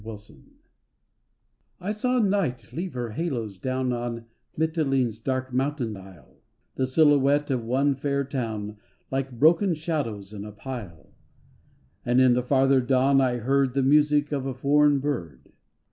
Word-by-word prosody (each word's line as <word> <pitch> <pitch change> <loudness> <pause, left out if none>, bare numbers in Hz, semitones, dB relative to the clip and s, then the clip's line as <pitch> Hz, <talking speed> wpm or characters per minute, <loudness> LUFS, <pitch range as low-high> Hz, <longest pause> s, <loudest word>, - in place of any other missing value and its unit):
THE 110 - -8
LURE 105 0 -14 1.4
I 190 +3 -3
SAW 250 +4 0
night 180 - -1
leave 180 +3 -4
her 120 -2 -3
halos 115 - -4
down 130 +2 -1
On 120 -1 -4 0.3
Mitylene's 135 -8 0
dark 130 +1 -3
mountain 130 -4 -1
isle, 95 -8 -15 0.4
The 130 - -1
silhouette 145 0 +3
of 125 -3 -1
one 135 +5 +1
fair 140 +1 -1
town 110 -6 -4 0.3
Like 135 0 -2
broken 170 - +4
shadows 135 - -4
in 100 -1 -7
a 105 - -8
pile. 105 -7 -9 0.9
And 120 +1 +2
in 130 -1 +5
the 125 - +1
farther 135 +1 +3
dawn 135 +2 +3
I 125 -2 +1
heard 135 +2 +1
The 135 - +2
music 150 +1 +3
of 135 -2 -2
a 130 - -4
foreign 145 +2 +3
bird. 85 - -5
130 Hz, 145 wpm, -25 LUFS, 120-145 Hz, 1.4 s, in